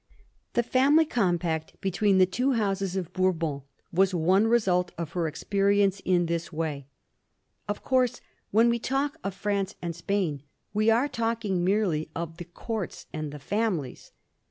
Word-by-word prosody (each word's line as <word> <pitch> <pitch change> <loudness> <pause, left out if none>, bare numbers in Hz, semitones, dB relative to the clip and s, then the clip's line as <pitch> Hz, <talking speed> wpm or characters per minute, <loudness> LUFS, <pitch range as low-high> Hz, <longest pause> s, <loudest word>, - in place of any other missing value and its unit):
The 240 - +2
family 280 +7 +4
compact 175 - -1
between 195 +1 +2
the 185 - +7
two 250 +9 0
Houses 195 -4 -1
of 180 -4 -3
Bourbon 170 -6 0 0.3
was 190 +1 +3
one 185 +6 +3
result 185 -7 +2
of 170 -2 -4
her 170 -2 -1
experience 200 +4 +1
in 180 -2 +2
this 170 0 -2
way. 155 -4 -3 0.8
Of 205 0 -4
course, 255 -2 +2 0.3
when 225 +3 +4
we 235 0 +2
talk 275 +5 -1
of 195 -1 -3
France 200 0 -1
and 170 -2 -4
Spain, 170 -5 -1 0.3
we 215 +1 +3
are 235 +5 +3
talking 225 -7 -1
merely 185 -6 +1
of 165 0 -5
the 175 - -7
Courts 195 +2 -5
and 155 -1 -4
the 150 - -7
families. 175 - -2
190 Hz, 155 wpm, -27 LUFS, 170-220 Hz, 0.8 s, the